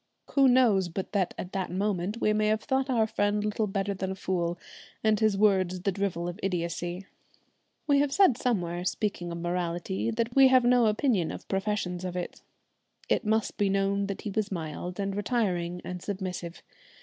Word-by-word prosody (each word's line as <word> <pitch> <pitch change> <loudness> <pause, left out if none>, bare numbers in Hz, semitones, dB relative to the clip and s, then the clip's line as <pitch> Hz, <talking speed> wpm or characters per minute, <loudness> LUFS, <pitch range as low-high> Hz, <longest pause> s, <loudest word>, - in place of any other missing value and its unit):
Who 275 -1 +5
knows 230 -8 +4
but 185 +3 -5
that 195 -4 0
at 180 - -6
that 190 -1 -2
moment 195 +2 -1
we 215 - +2
may 215 0 +2
have 215 +1 +1
thought 265 -1 0
our 230 -4 +3
friend 210 -1 0
little 210 0 0
better 195 0 -1
than 190 -1 -3
a 190 - -3
fool, 175 -2 -1 0.5
and 215 -1 +3
his 215 -3 +2
words 190 -3 +2
the 195 - +1
drivel 185 -3 -2
of 175 +3 -6
idiotcy? 175 0 -2 0.8
We 285 -2 +4
have 285 -1 +2
said 375 - +5
somewhere, 180 -9 -1
speaking 185 -2 -2
of 170 - -4
morality, 175 +4 -2
that 230 +1 -2
we 270 -1 +8
have 260 -1 +5
no 245 -1 +4
opinion 215 - +1
of - - -8
professions 195 -2 -2
of 180 -1 -4
it. 175 - -5 0.7
It - - +1
must 220 0 0
be 205 -1 +2
known 195 0 +1
that 200 - -5
he 210 - -4
was 210 0 -1
mild 175 +2 -5
and 195 -1 -2
retiring 185 -5 -1
and 180 -1 -5
submissive. 180 -3 -5
195 Hz, 185 wpm, -28 LUFS, 180-220 Hz, 0.8 s, we